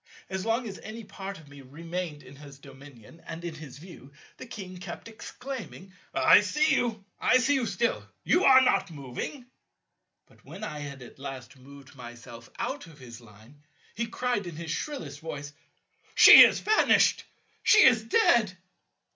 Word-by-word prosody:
As 190 +3 -4
long 230 +2 -1
as 195 - -8
any 220 +2 -9
part 195 -1 -8
of 155 - -16
me 145 0 -14
remained 165 +3 -7
in 135 - -14
his 140 -1 -13
dominion 135 +1 -16
and 170 +1 -8
in 170 - -5
his 150 -4 -11
view, 150 -4 -14 0.3
the - - -10
King 185 -5 -9
kept 180 +2 -9
exclaiming, 225 -4 -9 0.2
"I - - +5
see 300 +11 +1
you, 220 -5 -2
I 255 - +4
see 255 +3 +1
you 260 -4 0
still; 235 +1 -1 0.2
you 360 - +2
are 260 -4 +7
not 195 -6 +1
moving." 145 - -7 0.8
But - - -25
when - - -11
I 150 -1 -6
had 140 -3 -8
at 125 - -15
last 130 -2 -9
moved 135 +1 -16
myself 120 -1 -12
out 270 -9 -5
of 160 -2 -16
his 120 -3 -12
Line, 115 +6 -19 0.3
he 235 +1 -3
cried 235 -4 -3
in 170 - -8
his 165 0 -6
shrillest 165 - -6
voice, 145 -2 -8 0.6
"She - - +10
is - - 0
vanished; 435 +1 +3 0.4
she 430 - +6
is 230 -4 +4
dead." 225 - +2
170 Hz, 170 wpm, -27 LUFS, 140-225 Hz, 0.8 s, She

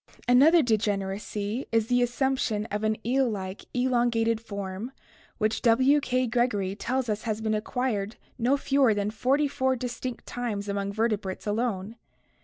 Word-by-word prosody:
Another 295 +7 +6
degeneracy 205 +1 -1
is 225 -1 +2
the 245 +2 +2
assumption 245 -3 0
of 210 +1 -2
an 215 0 +1
eel 260 +1 +2
like, 190 -2 -5
elongated 240 -3 +1
form 200 +1 -5 0.5
which 220 -1 0
W. 260 +5 +4
K. 255 -2 0
Gregory 225 -5 0
tells 255 +4 -2
us 215 -1 -1
has 215 -2 -2
been 220 -1 -1
acquired 215 -1 -2 0.2
no 250 +4 +3
fewer 270 -5 +3
than 205 0 -1
forty 270 +6 +1
four 260 -1 0
distinct 250 0 -5
times 220 -5 -4
among 200 0 -2
vertebrates 210 -3 -2
alone. 215 -1 -2
230 Hz, 145 wpm, -27 LUFS, 210-250 Hz, 0.5 s, Another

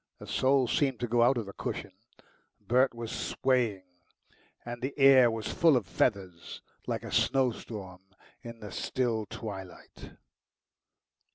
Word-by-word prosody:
The - - -11
soul 130 -1 +2
seemed 135 +1 0
to 120 - -1
go 120 +1 +2
out 120 +2 +4
of 115 - -2
the 100 - -9
cushion - - -5 0.7
Bert 125 +1 +2
was 115 -1 -6
swaying, 120 -7 0 0.8
and 120 0 -6
the 130 +3 -4
air 135 -3 +7
was 110 -2 -4
full 165 -5 +4
of 115 - -2
feathers, 95 -5 -2 0.2
like - - -2
a - - -7
snowstorm 110 -8 -1 0.4
in 115 -1 -10
the 105 -2 -8
still 115 -1 -2
twilight. 95 -4 -9
120 Hz, 135 wpm, -29 LUFS, 105-130 Hz, 0.8 s, air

